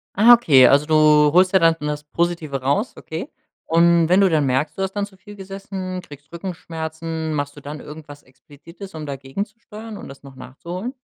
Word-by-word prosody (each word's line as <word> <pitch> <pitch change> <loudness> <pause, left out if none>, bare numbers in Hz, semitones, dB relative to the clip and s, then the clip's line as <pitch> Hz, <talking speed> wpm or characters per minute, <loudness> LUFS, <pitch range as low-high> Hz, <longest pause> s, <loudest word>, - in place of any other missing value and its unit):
Ah, 225 +5 +7
okay, 150 - +6
also, 145 +3 +4
du 155 - +1 0.4
holst 185 +2 +4
ja 190 - +6
dann 165 -2 +3
das 150 0 -3
Positive 160 -3 -2
raus, 140 - -1
okay. 160 +1 -7 0.4
Und 170 0 +4
wenn 180 +3 +4
du 195 - +5
dann 155 -3 +2
merkst, 135 +7 -1
du - - -1
hast 190 0 -2
dann 205 -1 -1
zu 200 -2 -18
viel 205 +2 -13
gesessen, 190 -1 -6
kriegst 145 -4 -15
Rückenschmerzen, 160 -2 -5
machst 145 -1 -3
du - - -10
dann 145 +1 -8
irgendwas 150 -1 -11
explizites, 150 +9 -14
um 155 -1 -6
dagegenzusteuern 205 - -7
und - - -10
das 135 - -13
noch 135 -1 -14
nachzuholen? 180 - -7
165 Hz, 190 wpm, -21 LUFS, 145-190 Hz, 0.4 s, Ah